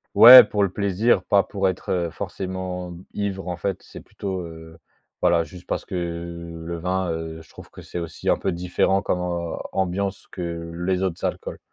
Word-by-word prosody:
Ouais 125 +3 +12
pour 105 - -2
le 100 - +3
plaisir, 100 +1 +1
pas 100 +1 +4
pour 100 -1 -1
être, 95 - -3
heu, 85 -2 0
forcément 90 -1 -5 0.2
ivre 100 -2 -3
en 90 -1 -3
fait, 95 +1 -3
c'est - - -12
plutôt, 95 -2 -5
heu, 80 -1 -10 0.4
voilà 85 -1 +3
juste 90 +3 -12
parce - - -3
que - - -6
le 85 -1 -5
vin, 90 +1 -1
heu, 80 0 -5
je 80 - -19
trouve - - -14
que - - -12
c'est - - -8
aussi 85 -2 -4
un - - +4
peu 95 - -1
différent 90 +2 +1
comme 95 - -1
am 85 -1 -3
ambiance 95 +1 -2
que 85 -2 -5
les 90 +2 -1
autres 95 -3 -2
alcools. - - -4
90 Hz, 190 wpm, -23 LUFS, 85-95 Hz, 0.4 s, Ouais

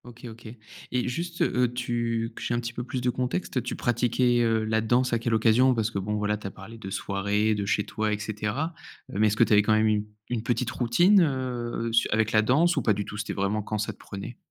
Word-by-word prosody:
OK, 120 0 -12
OK. 115 +1 -12 0.4
Et 125 0 0
juste, 170 +7 -4
heu, 125 -1 +1
tu 120 -2 -2
que - - -9
j'ai 120 - -1
un - - 0
petit 120 0 -5
peu 120 - -4
plus 125 +1 -4
de 125 - +1
contexte, 130 +2 -2
tu - - -4
pratiquais, 120 0 +1
heu, 115 -1 +2
la 110 0 +1
danse 120 +3 +1
à 115 - +2
quelle 115 0 -1
occasion, 120 +4 +4
parce 110 -1 0
que, 100 - -2
bon 105 +2 -2
voilà, 105 0 0
tu 105 - -7
as - - -4
parlé 110 +4 -11
de 95 - -7
soirée, 100 +2 0
de 105 -1 -2
chez 105 - +1
toi 110 +2 -2
et 105 - 0
cetera. 110 +9 -3 0.4
Mais 105 +2 +2
est-ce 105 0 0
que - - +6
tu 115 - +2
avais 105 - +7
quand 105 +1 +2
même 110 0 +3
une 105 -1 +1 0.2
une 120 -3 -2
petite 120 +1 -1
routine, 175 - +4
heu, 120 -4 -3
su 115 +1 +3
avec 110 0 +1
la 110 - +4
danse 150 +10 +3
ou - - +2
pas 110 - +3
du 100 +1 -2
tout, 105 - -7
c'était 105 - -3
vraiment 100 +2 -1
quand 105 +1 -4
ça 105 - -2
te - - -25
prenait? 100 +5 -8
115 Hz, 255 wpm, -26 LUFS, 105-125 Hz, 0.4 s, avais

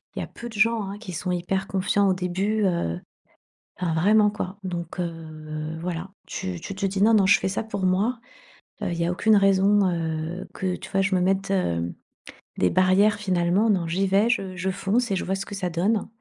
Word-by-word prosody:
Il - - -3
y - - -2
a - - -5
peu 235 - -9
de 225 - -12
gens, 220 +1 +2
hein, 200 - -6
qui 195 -5 -8
sont 180 +3 -3
hyper 190 +2 -1
confiants 200 +1 +1
au - - +4
début, 190 +4 0
heu, 90 - 0 0.8
enfin 175 -3 -1
vraiment 210 +5 +4
quoi, 200 -1 -5
donc 175 -2 -5
heu, 155 -2 -5
voilà! 175 +1 -4 0.2
Tu 185 -2 -5
tu 195 - -6
te 195 +1 -1
dis: 195 0 -1
«Non, 225 +2 +6
non, 200 -3 +5
je 195 +1 +6
fais - - -1
ça 190 +3 -2
pour 200 -3 -4
moi. 205 +7 +1 0.6
Heu, - - -1
il 170 - -3
y 170 - +1
a 175 - 0
aucune 215 +4 +3
raison, 195 +1 +4
heu, 165 +1 -3
que, 185 -2 -2
tu - - -10
vois, 195 - +2
je 195 +1 0
me 180 - +2
mette, 195 +1 +1
hem, 85 - 0 0.6
des 90 - +3
barrières 190 - +4
finalement. 185 +1 +1
Non, 180 -5 +1
j'y 190 +4 0
vais, 200 +4 +3
je 195 -6 -1
je 185 +2 -2
fonce 200 +5 0
et 195 - +2
je - - -2
vois 190 - 0
ce 195 0 -4
que 200 - -7
ça 185 -2 -2
donne». 195 +6 0
190 Hz, 225 wpm, -25 LUFS, 175-200 Hz, 0.8 s, Non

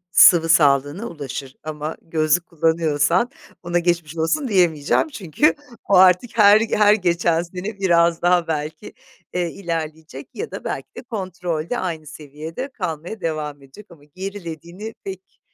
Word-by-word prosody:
sıvı 165 -3 +7
sağlığına 145 - +3
ulaşır 135 - -7
ama 155 0 -5
gözlük 165 +1 +1
kullanıyorsan 165 - +1 0.3
buna 175 0 +1
geçmiş 170 -2 -1
olsun 255 - 0
diyemeyeceğim; 175 - +2
çünkü 225 - +1 0.3
o 200 - +3
artık 185 +5 +5
her 210 +1 +7
her 210 -2 +4
geçen 170 -4 +1
sene 185 +4 -7
biraz 170 -3 +3
daha 175 -1 +3
belki, 155 +5 -4 0.4
eee, 175 -2 -1
ilerleyecek 160 -5 -6
ya 450 - -5
da - - -8
belki - - -4
de - - -7
kontrolde 180 -3 -4
aynı 160 -4 -4
seviyede 155 - -7
kalmaya 180 - -5
devam 150 -4 -4
edecek 135 +10 -15
ama 150 -4 -17
gerilediğini 185 +3 -8
pek, 190 -1 -9
170 Hz, 135 wpm, -21 LUFS, 155-190 Hz, 0.4 s, sıvı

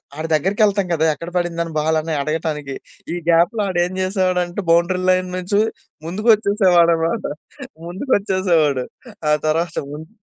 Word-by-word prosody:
ఆడి 155 +2 -5
దగ్గరికెళ్తాం 195 +5 +2
గదా! 160 -1 +1
ఎక్కడ 170 +3 -7
పడింది 175 -1 -1
అని 165 - -6
బాల్ 160 +1 +1
అని 160 +1 -4
అడగటానికి. 150 -2 -3 0.4
ఈ - - -2
గ్యాప్‌లో 170 +6 +3
ఆడేం 175 0 0
చేసేవాడంటే, 185 -1 0
బౌండరీ 170 +2 +2
లైన్ 185 0 +1
నుంచి 185 +3 -1 0.5
ముందుకొచ్చేసేవాడన్నమాట, 190 -3 +2 0.6
ముందుకొచ్చేసేవాడు. 180 - +1 0.5
ఆ - - +5
తర్వాత 165 +2 0 0.2
ముందు 155 +2 -8
175 Hz, 125 wpm, -19 LUFS, 160-190 Hz, 0.6 s, ఆ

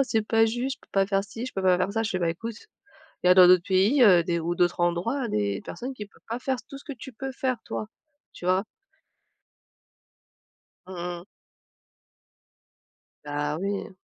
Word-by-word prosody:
c'est 225 -4 0
pas 225 0 +4
juste, 245 +4 -2
je - - -45
peux - - -24
pas 195 -1 +3
faire 195 0 0
ci, 230 +4 -7
je - - -7
peux 195 - -3
pas 185 -1 +4
faire 190 +2 0
ça». 225 0 0
Je 220 - -2
fais: 185 - -1
«Bah 170 -2 0
écoute, 225 +6 -6 0.7
il - - +3
y - - +6
a - - +9
dans 180 -1 +8
d'autres 180 -1 +6
pays, 200 +9 +3
heu, 180 -5 +7
des 170 -1 -1
ou 170 +2 -2
d'autres 175 0 +1
endroits, 225 +10 0
des 100 - -1
personnes 260 +2 -6
qui 210 -4 -7
peuvent 200 - -24
pas 230 +2 -3
faire 260 0 -1
tout 275 - -9
ce - - -14
que 285 - -6
tu 260 +2 -10
peux 270 +4 -5
faire 255 -1 -1
toi». 215 - -4 0.5
Tu 175 - -10
vois? 185 +2 +2 2.2
Mmh 190 - -9 0.3
mh. - - -14 2.0
Bah 145 +1 -2
oui. 200 +1 -3
195 Hz, 200 wpm, -26 LUFS, 180-235 Hz, 2.2 s, a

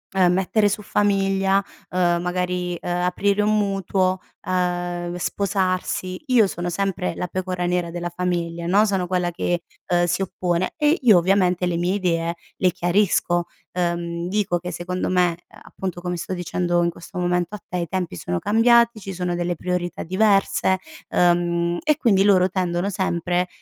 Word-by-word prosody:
ehm, 180 -2 +4
mettere 205 +3 +2
su 210 +1 -2
famiglia, 195 -1 +1 0.3
uhm, 175 -1 +1
magari, 180 0 -2
uhm, - - -5
aprire 180 +3 +1
un 215 +1 +2
mutuo, 195 -2 0 0.3
uhm, 175 -1 -1
sposarsi, 185 -1 -1
io 240 -5 +5
sono 175 -1 -4
sempre 185 -1 -2
la 180 - -3
pecora 180 0 -3
nera 175 -1 0
della 175 0 -4
famiglia, 170 -2 -2
no. 205 +4 +4
Sono 190 -3 0
quella 180 -1 0
che, 175 0 -1 0.3
uhm, 175 0 +3
si 175 +2 0
oppone 180 -1 -1
e 300 +2 +3
io 220 -8 +6
ovviamente 180 0 +2
le 175 -1 0
mie 175 +3 0
idee 170 -3 0 0.2
le 185 -1 +3
chiarisco, 175 -1 +1 0.3
uhm, 170 -1 -2
dico 195 -4 0
che 180 +1 -6
secondo 180 +1 -3
me, 180 -2 +2
uhm, - - -16
appunto, 185 -2 -6
come 180 0 -3
sto 170 - -4
dicendo 175 -1 0
in 170 - +2
questo 180 +2 -11
momento 180 +2 0
a - - -8
te, 180 - -3
i 170 - -2
tempi 180 - -3
sono 90 0 -3
cambiati, 235 - +4
ci 195 0 -7
sono 180 -1 -2
delle 175 0 -1
priorità 180 +1 -3
diverse, 195 0 +2 0.3
uhm, 175 0 +2
e 305 -1 +2
quindi 200 -9 +3
loro 185 -3 +5
tendono 180 0 -1
sempre 180 -2 0
180 Hz, 165 wpm, -22 LUFS, 175-195 Hz, 0.3 s, io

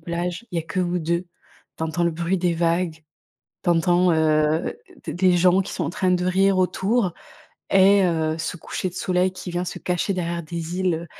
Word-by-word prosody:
plage, 175 +6 -4
il - - -2
y - - +2
a - - -2
que 185 +3 -3
vous 180 0 0
2, 170 +2 -1 0.5
tu - - -4
entends 165 +2 -2
le 170 - +2
bruit 170 +3 -1
des 175 -1 +1
vagues, 165 -1 -1 0.6
tu 175 - +2
entends, 175 +1 +3
heu, 155 +1 +2 0.3
d - - -5
des 180 0 +3
gens 180 +2 +4
qui - - -8
sont - - -3
en - - -2
train 185 +1 0
de 180 0 +1
rire 195 +1 +3
autour 190 +2 +1 0.6
et 195 0 +5
heu, 160 -2 0
ce 165 - -3
coucher 185 - -4
de - - -17
soleil 185 0 0
qui 180 -1 -7
vient 175 +1 -2
se - - -5
cacher 180 +2 -1
derrière 170 -1 -2
des 170 +2 -5
îles, 185 -3 +1
heu, 170 +1 -7
175 Hz, 215 wpm, -23 LUFS, 170-185 Hz, 0.6 s, et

